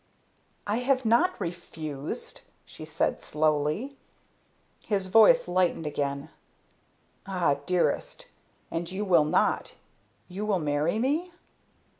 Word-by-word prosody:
"I 210 +2 0
have 260 0 +1
not 235 +11 +3
refused," 160 -5 -6 0.2
she - - -10
said - - -1
slowly. 155 - 0 0.9
His 200 -3 0
voice 225 +5 +6
lightened 180 -2 +1
again. 140 -1 -3 1.0
"Ah, 180 -7 +1
dearest! 180 - 0 0.5
And 170 +1 -3
you 200 +3 -3
will 170 -6 +4
not! 150 - +1 0.5
You 190 +3 -5
will 205 -3 +2
marry 150 +3 0
me?" 295 +9 0
180 Hz, 105 wpm, -27 LUFS, 155-220 Hz, 1.0 s, voice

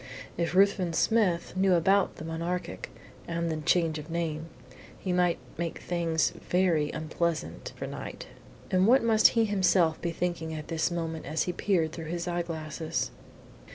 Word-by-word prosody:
If 170 +1 -1
Ruthven 195 -3 +4
Smith 190 -4 +2
knew 190 -1 +4
about 195 +3 +3
the 155 - -8
Monarchic 170 +2 -3 0.4
and 170 0 -1
the 160 - -1
change 160 0 +1
of 150 +2 -9
name, 165 -1 -2 0.5
he 185 - -2
might 180 -1 +3 0.2
make 170 -1 -2
things 165 -2 0
very 175 -5 +1
unpleasant 155 - -3
for - - -5
Knight. - - -7 0.5
And 185 +1 +4
what 255 +2 +6
must 220 -2 +6
he 225 - +5
himself 185 -5 +2
be 170 - -1
thinking 165 -1 -2
at 155 -1 -7
this 165 -1 +1
moment 165 -3 -4
as 155 +2 0
he 180 - -2
peered 175 -4 +1
through 165 0 -7
his 170 +2 -3
eyeglasses? 165 -2 -2
170 Hz, 155 wpm, -29 LUFS, 160-180 Hz, 0.5 s, what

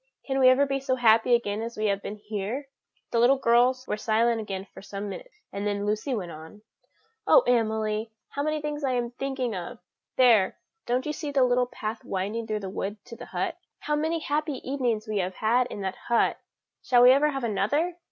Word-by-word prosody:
Can 270 -1 -1
we 255 -1 +7
ever 265 +2 +5
be 275 0 -1
so 265 -1 0
happy 230 0 +5
again 210 -2 -2
as 230 +1 -6
we 215 - -1
have 200 -1 +1
been 205 - -6
here?" 210 +5 -4 0.5
The 230 - +2
little 250 +4 +5
girls 255 +1 +3
were - - -1
silent 225 +1 +1
again 195 -2 -5
for - - -11
some 200 0 -6
minutes, 460 - -10
and 200 +1 -2
then 205 0 -1
Lucy 215 +6 -1
went 180 -6 -4
on: 160 +7 -12 0.6
"Oh, - - +7
Emily! 220 - 0 0.2
how 285 - -4
many 305 +1 -1
things 295 0 -3
I 265 -2 +1
am 240 -1 -1
thinking 260 -3 -3
of! 175 -2 -6 0.4
There 230 -7 +5 0.3
don't 250 +2 0
you 300 - -2
see 300 -1 -5
the 275 -2 +3
little 250 0 +2
path 220 -2 -5
winding 205 +4 -3
through 215 -1 -2
the 195 - -5
wood 205 +2 -4
to 235 - -10
the - - -10
hut? - - -3 0.2
How 300 - 0
many 320 +3 0
happy 305 -1 -1
evenings 245 -5 -1
we 215 -1 -1
have 185 0 -2
had 240 +3 +2
in 205 - -7
that 190 -1 -3
hut! 235 -1 +2 0.4
Shall 245 -1 +4
we 250 - +9
ever 285 +3 +4
have 270 -3 -4
another? 285 - 0
235 Hz, 210 wpm, -26 LUFS, 210-270 Hz, 0.6 s, we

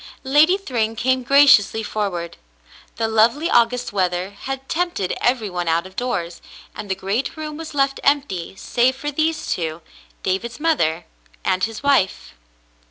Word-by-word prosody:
Lady 300 +7 +4
Thryng 230 - -2
came 260 +3 +1
graciously 265 -5 +5
forward. 195 -6 -3 0.6
The 225 0 -1
lovely 230 +9 +2
August 240 -1 +2
weather 185 -1 -1
had 270 +6 -6
tempted 340 - -1
every 240 -3 +1
one 180 -2 -4
out 165 +2 +1
of 190 0 -12
doors, 175 -9 -3 0.3
and 205 - -7
the 190 - 0
great 200 - -2
room 305 -1 -5
was 320 -1 -8
left 275 -1 +1
empty 275 -12 0
save 245 +5 +1
for 295 +2 -4
these 315 +2 -1
two, 160 -1 -3 0.4
David's 210 +7 -2
mother 175 - +1 0.4
and 185 - +1
his 225 -1 -7
mfe. 275 -10 +1
230 Hz, 150 wpm, -21 LUFS, 190-280 Hz, 0.6 s, graciously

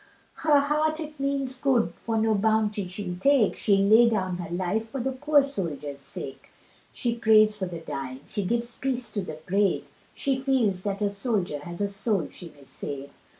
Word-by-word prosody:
Her 295 -2 +4
heart 305 +2 +1
it 305 -2 -7
means 275 -2 -1
good 260 -3 +2
for 225 -1 -1
no 220 0 +3
bounty 215 -1 +1
she'll 180 -1 -5
take, 275 +1 +3
She'd 195 -1 +3
lay 230 +3 +7
down 185 -5 -1
her 175 -2 -6
life 185 +6 -1
for 270 - -4
the 265 +2 -1
poor 290 +2 +3
soldier's 155 - -4
sake, 135 0 -8 0.4
She 240 -2 -1
prays 215 -2 +5
for 190 -3 -3
the 170 -2 -6
dying, 135 -4 -5
she 205 - -2
gives 235 +4 -2
peace 255 -3 -1
to 205 - -2
the 155 -4 -6
brave, 200 +2 +1 0.3
She 270 -1 0
feels 250 -9 +1
that 200 0 -1
a 200 - +1
soldier 200 - -1
has 175 +5 -7
a 200 - +2
soul 200 -4 -1
she 175 - -10
may 140 - -16
save. 135 +1 -6
215 Hz, 190 wpm, -26 LUFS, 180-255 Hz, 0.4 s, lay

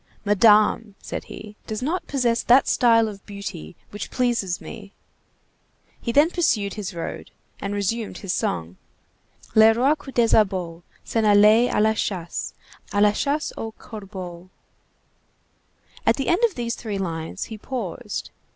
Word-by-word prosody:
"Madame," 210 0 +4
said - - -6
he, 210 0 -10
"does 215 +2 -4
not 340 +7 -2
possess 240 -4 +1
that 250 +3 +5
style 230 -2 +4
of 200 -2 -8
beauty 200 - -7 0.2
which 205 - -6
pleases 235 -8 0
me." 210 -3 -10 1.1
He 235 - -2
then 295 +7 +4
pursued 220 - +1
his 200 -3 -6
road, 165 - -6 0.3
and 200 0 -3
resumed 210 +2 -2
his 195 -3 -3
song:— 85 +1 -2 0.8
"Le 220 0 +7
roi 260 +5 +3
Coupdesabot 210 - +1 0.2
S'en 225 - 0
allait 215 +3 +6
à - - +1
la 220 +1 +4
chasse, 180 -5 -3 0.4
À 205 - 0
la 210 0 +6
chasse 285 +8 -1
aux 225 0 -5
corbeaux—" 185 -4 -9 1.6
At - - +5
the 270 - -2
end 355 +7 +2
of 445 - -2
these 235 -1 -2
three 215 -4 -4
lines 165 -4 -4
he 220 - -7
paused. 255 +3 -5
215 Hz, 140 wpm, -23 LUFS, 195-235 Hz, 1.6 s, Le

